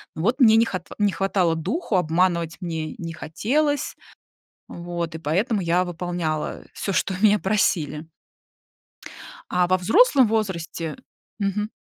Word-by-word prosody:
Ну, 160 - -4
вот 245 +7 +1
мне 220 -2 +7
не 230 - +5
хат 185 -5 -5
не 205 -1 +3
хватало 185 -2 +1
духу, 195 - -2
обманывать 170 -1 +1
мне 160 -3 -4
не 165 -1 -6
хотелось. 285 - -1 0.7
Вот, 170 -1 -5
и - - -3
поэтому 195 - 0
я 175 +1 +2
выполняла 175 -3 -3
всё, 195 - -3
что 185 +1 0
меня 210 -1 +5
просили. 160 -6 0 1.4
А 180 0 +2
во 185 0 +3
взрослом 265 - +5
возрасте 170 -7 -2 0.4
мгм. 210 +1 -1
180 Hz, 130 wpm, -23 LUFS, 165-210 Hz, 1.4 s, мне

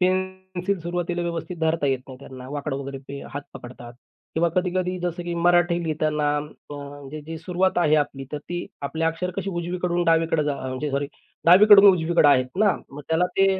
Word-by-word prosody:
Pencil 185 +1 -1
सुरुवातीला 175 +1 -2
व्यवस्थित 170 +1 -4
धरता 160 -2 +1
येत 135 -1 +1
नाही 130 -1 -10
त्यांना. 130 -2 -10
वाकडं 145 -1 -3
वगैरे 140 0 -6
ते 140 0 -7
हात 145 - -4
पकडतात. 120 -2 -10 0.4
किंवा 170 +1 +2
कधी-कधी 180 +1 -1
जसं 175 0 -3
की 175 0 -4
मराठी 175 0 +3
लिहिताना, 150 -2 0
अ, 145 0 -8
म्हणजे 145 +1 -8
जी 165 0 -5
सुरुवात 180 +3 0
आहे 155 -3 +3
आपली, 140 -2 -1
तर 150 - -2
ती 175 +4 -5 0.2
आपली 160 +3 -3
अक्षर 165 +3 -1
कशी 195 0 -2
उजवीकडून 175 0 -1
डावीकडे 165 -1 +2
जा 145 -1 0
म्हणजे 130 +3 -3
सॉरी 140 +1 -1 0.4
डावीकडून 200 +3 +8
उजवीकडे 170 -3 +3
आहेत 130 -3 +4
ना 210 -1 +5 0.2
मग 140 - -9
त्याला 165 +2 +2
ते, 195 - +5
165 Hz, 180 wpm, -24 LUFS, 145-180 Hz, 0.4 s, डावीकडून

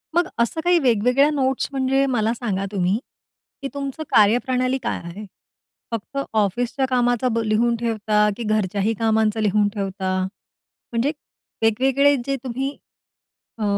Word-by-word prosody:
मग 345 -1 +3
असं 235 +7 0
काही 350 0 +4
वेगवेगळ्या 250 +3 +3
नोट्स, 265 -2 0
म्हणजे 270 0 +1
मला 230 -3 +1
सांगा 200 -5 -2
तुम्ही, 195 +2 +1 0.6
की 275 - -3
तुमचं 280 +2 -4
कार्यप्रणाली 250 +4 +3
काय - - -2
आहे? 180 +5 -8 0.7
फक्त 230 +5 -5 0.2
ऑफिसच्या 235 +6 0
कामाचा 245 0 +2
ब 230 - +2
लिहून 230 +2 +2
ठेवता, 215 -2 +1
की 235 - -4
घरच्याही 210 0 0
कामांचं 220 -1 +2
लिहून 210 0 +2
ठेवता? 190 -2 -2 0.7
म्हणजे 240 +5 +1 0.5
वेगवेगळे 270 +6 +3
जे 275 - 0
तुम्ही, 265 +3 -3 0.8
अ, 220 - -4
235 Hz, 130 wpm, -22 LUFS, 210-265 Hz, 0.8 s, काही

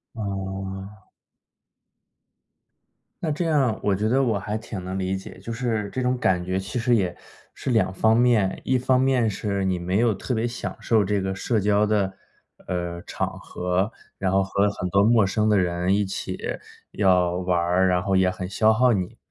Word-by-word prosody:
哦。 95 -1 -5 2.2
那 160 -3 0
这 160 +4 -1
样 140 -8 +2
我 100 -2 +2
觉 105 +3 0
得 135 +2 +3
我 115 -6 +1
还 105 +3 -3
挺 110 -4 -7
能 95 +1 -4
理 95 0 -1
解， 95 - -9
就 115 - -7
是 115 -4 -2
这 130 - -3
种 125 0 +1
感 90 -7 +1
觉 95 +1 -1
其 95 +6 -5
实 120 +1 +2
也 90 -5 0 0.4
是 - - -4
两 110 -5 +2
方 110 +4 +3
面， 115 -6 +2
一 130 - +2
方 125 +1 +2
面 130 -3 +2
是 100 -1 -2
你 95 -2 0
没 90 +3 0
有 115 -1 +3
特 100 +6 -4
别 110 +1 0
享 120 +1 -4
受 110 -3 +3
这 100 +1 0
个 95 0 -2
社 110 +3 0
交 105 +1 +3
的， 105 -3 +1 0.5
呃， 85 -1 -3
场 - - -4
合， 90 +4 -2 0.3
然 95 -1 0
后 95 0 +3
和 100 +1 +1
很 90 -2 -4
多 100 +2 +3
陌 110 -1 +5
生 105 +3 0
的 105 -1 +4
人 90 +1 +1
一 105 0 +1
起 95 - -4 0.5
要 90 -3 +3
玩 90 0 0
儿， 90 +2 +2
然 90 -1 +1
后 95 -1 +1
也 95 -1 +4
很 90 0 -5
消 110 +3 +3
耗 125 +3 +4
你。 95 -4 -3
100 Hz, 205 characters per minute, -24 LUFS, 95-115 Hz, 2.2 s, 陌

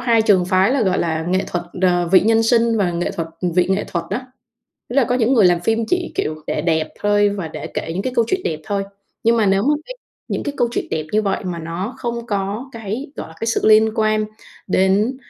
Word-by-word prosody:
hai 235 -3 +3
trường 190 -4 +4
phái 190 +5 +3
là, 270 -4 +2
gọi 190 -2 +1
là, 160 -1 -1
nghệ 185 +1 +1
thuật, 175 -1 -3 0.2
ờ, 175 -2 +2
vị 185 - +8
nhân 225 +2 +3
sinh 230 0 +3
và 190 -4 +2
nghệ 170 +1 -1
thuật 165 -1 -4 0.3
vị 180 0 +3
nghệ 195 +2 +1
thuật 170 -2 -2
đó. 250 - -1 0.7
Tức 245 - -5
là 275 - +5
có 245 - 0
những 250 +1 +2
người 215 -7 +5
làm 175 -1 +3
phim 225 +4 +1
chỉ 360 -1 -1
kiểu 155 0 -2
để 150 - -2
đẹp 160 -2 +1
thôi 205 0 +3
và 195 -5 -4
để - - -7
kể - - -5
những 185 +4 -2
cái 255 - -2
câu 230 - +4
chuyện 380 - 0
đẹp 155 -1 -2
thôi. 200 +2 -1 0.4
Nhưng 230 +1 +3
mà 215 -3 +2
nếu 195 +1 +3
mà 295 +4 +3
cái - - -7 0.3
những - - -2
cái 285 - -4
câu 240 - +2
chuyện - - -2
đẹp 155 -1 -2
như 215 0 +3
vậy, 195 -1 -1
mà 175 -2 -3
nó 175 +8 -5
không 235 -1 -4
có 205 +4 -3
cái 230 +6 -5
gọi - - -6
là, 160 - -14
cái 225 - -2
sự 225 - +1
liên 220 +1 +6
quan 215 0 +1 0.4
đến, 195 +6 +2
205 Hz, 250 wpm, -20 LUFS, 180-230 Hz, 0.7 s, vị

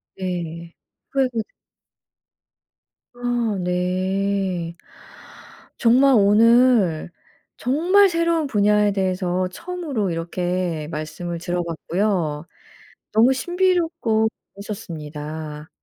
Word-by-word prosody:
네. 170 -2 -5 0.4
후회가 270 -2 +2
되 - - -50 1.7
아 240 -4 -1
네. 185 0 -1 1.0
정말 260 +4 +5
오늘 215 -4 +4 0.5
정말 355 +10 +4
새로운 335 -3 +1
분야에 210 -2 +3
대해서 185 -1 0
처음으로 300 - -3
이렇게 175 -1 -2
말씀을 155 +3 -5
들어 175 +1 -2
봤고요. 170 -2 -2 0.7
너무 230 +4 +5
신비롭고 330 -8 +1 0.3
재밌었습니다. 155 -6 -7
195 Hz, 185 characters per minute, -22 LUFS, 170-245 Hz, 1.7 s, 정말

